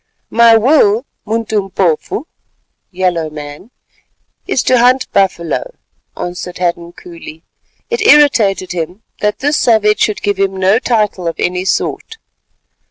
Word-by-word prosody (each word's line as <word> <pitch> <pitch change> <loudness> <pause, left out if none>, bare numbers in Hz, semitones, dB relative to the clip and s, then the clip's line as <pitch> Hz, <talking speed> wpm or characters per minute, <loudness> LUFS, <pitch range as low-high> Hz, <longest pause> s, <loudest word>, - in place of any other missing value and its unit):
"My 230 0 +6
will, 230 -2 +3 0.2
Muntumpofu 205 - -1 0.6
(yellow 180 -4 -1
man), 150 +6 -10 0.8
is - - 0
to 255 -1 +3
hunt 250 +2 +3
buffalo," 195 - -1 0.4
answered 180 0 -6
Hadden 170 -1 -2
coolly. 165 -2 -12 0.5
It 470 -1 -1
irritated 230 - +4
him 180 +4 -5 0.2
that 210 0 -1
this 290 +2 0
savage 215 -2 +2
should 215 - 0
give 205 -2 -1
him 195 -1 0
no 190 +4 +3
title 210 -8 -1
of 165 - -2
any 180 +1 -2
sort. 450 - -2
200 Hz, 120 wpm, -14 LUFS, 180-230 Hz, 0.8 s, My